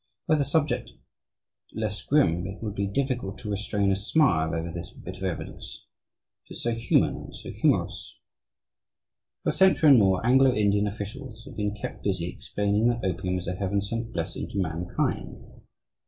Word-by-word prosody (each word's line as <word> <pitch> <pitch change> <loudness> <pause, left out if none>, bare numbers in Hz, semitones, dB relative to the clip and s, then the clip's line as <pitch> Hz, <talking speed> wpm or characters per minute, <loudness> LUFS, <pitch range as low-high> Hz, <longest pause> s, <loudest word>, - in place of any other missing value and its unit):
Were 155 - +4
the 145 - +2
subject 145 -3 0 0.9
less 105 -2 -2
grim, 90 - +2
it 100 +3 -8
would 105 -2 -3
be 100 -1 -1
difficult 120 -3 -2
to 105 -4 -5
restrain 100 -1 0
a - - +3
smile 95 - +2
over 85 +1 -3
this 85 +1 -6
bit 90 +1 -9
of 95 - -8
evidence 95 -4 -5 0.6
it - - -8
is - - -6
so 120 - +1
human, 115 +1 +2
and - - -10
so - - -8
humorous. - - 0 1.3
For - - +1
a - - +3
century 185 -5 +5
and 130 - +8
more, 95 0 +3
Anglo 130 +1 +5
Indian 105 0 +2
officials 110 +3 -7
have 135 -3 -10
been 105 -1 -1
kept 105 - -7
busy 95 -4 0
explaining 105 +4 0
that 120 -3 0
opium 90 0 -1
is 90 - -6
a 90 - -1
heaven 100 +2 0
sent 115 +3 -3
blessing 80 -1 -4
to - - -6
mankind. 90 -1 -2
105 Hz, 175 wpm, -27 LUFS, 95-120 Hz, 1.3 s, and